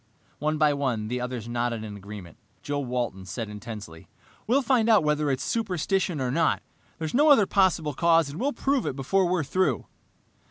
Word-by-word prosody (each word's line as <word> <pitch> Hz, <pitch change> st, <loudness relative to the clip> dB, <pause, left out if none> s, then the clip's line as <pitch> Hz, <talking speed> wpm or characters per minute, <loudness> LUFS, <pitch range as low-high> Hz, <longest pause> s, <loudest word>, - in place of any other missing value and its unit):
One 155 Hz, +1 st, 0 dB
by 150 Hz, -1 st, +4 dB
one, 125 Hz, -7 st, -2 dB
the 125 Hz, +1 st, -2 dB
others 125 Hz, -2 st, -4 dB
nodded 120 Hz, -1 st, -2 dB
agreement. 100 Hz, -2 st, -9 dB, 0.3 s
Joe 145 Hz, -1 st, -2 dB
Walton 120 Hz, -7 st, -3 dB
said 110 Hz, +3 st, -5 dB
intensely, 105 Hz, -6 st, -9 dB, 0.4 s
"We'll 265 Hz, +5 st, +3 dB
find 245 Hz, -4 st, +2 dB
out 215 Hz, -6 st, +6 dB
whether 150 Hz, -1 st, +1 dB
it's 135 Hz, -1 st, -1 dB
superstition 190 Hz, -, -1 dB
or 130 Hz, -2 st, -1 dB
not! 160 Hz, +4 st, +1 dB, 0.3 s
There's 160 Hz, -1 st, -4 dB
no 295 Hz, +4 st, +5 dB
other 270 Hz, -8 st, +7 dB
possible 180 Hz, -6 st, +2 dB
cause, 165 Hz, +1 st, +3 dB
and 155 Hz, -, -7 dB
we'll 280 Hz, +3 st, +1 dB
prove 275 Hz, -2 st, 0 dB
it -, -, -2 dB
before 180 Hz, +8 st, +1 dB
we're 175 Hz, -2 st, +1 dB
through." 145 Hz, -, 0 dB
145 Hz, 175 wpm, -26 LUFS, 120-185 Hz, 0.4 s, other